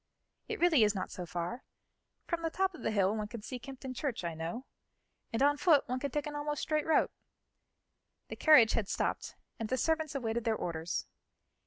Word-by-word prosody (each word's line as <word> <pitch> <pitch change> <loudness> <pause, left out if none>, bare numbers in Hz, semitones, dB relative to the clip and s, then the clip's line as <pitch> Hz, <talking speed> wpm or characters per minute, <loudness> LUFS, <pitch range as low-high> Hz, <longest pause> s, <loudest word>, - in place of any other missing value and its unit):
It 445 - -4
really 330 -9 +5
is 210 0 +3
not 185 - -3
so 180 -1 -6
far; 175 +10 -4 0.6
from 340 -1 -2
the 330 - 0
top 380 +3 0
of 340 - -11
the - - 0
hill 200 -1 +2
one 215 -1 -2
can 210 0 -8
see 250 +2 -5
Kympton 265 0 -7
Church, 255 -5 -3
I 170 -1 -2
know, 165 +11 -5 0.7
and 225 +4 +1
on 290 +1 +4
foot 295 -2 +4
one 255 +1 -1
can 280 - -2
take 295 +2 -2
an 295 -1 -5
almost 295 0 -2
straight 305 0 0
route." 320 - +3 1.2
The - - -6
carriage 255 -9 +7
had 210 -4 -1
stopped - - -2 0.2
and 225 -1 -3
the 260 - +1
servants 315 0 0
awaited 235 -3 -1
their 225 -2 +1
orders. 170 -3 -3
255 Hz, 200 wpm, -32 LUFS, 215-300 Hz, 1.2 s, carriage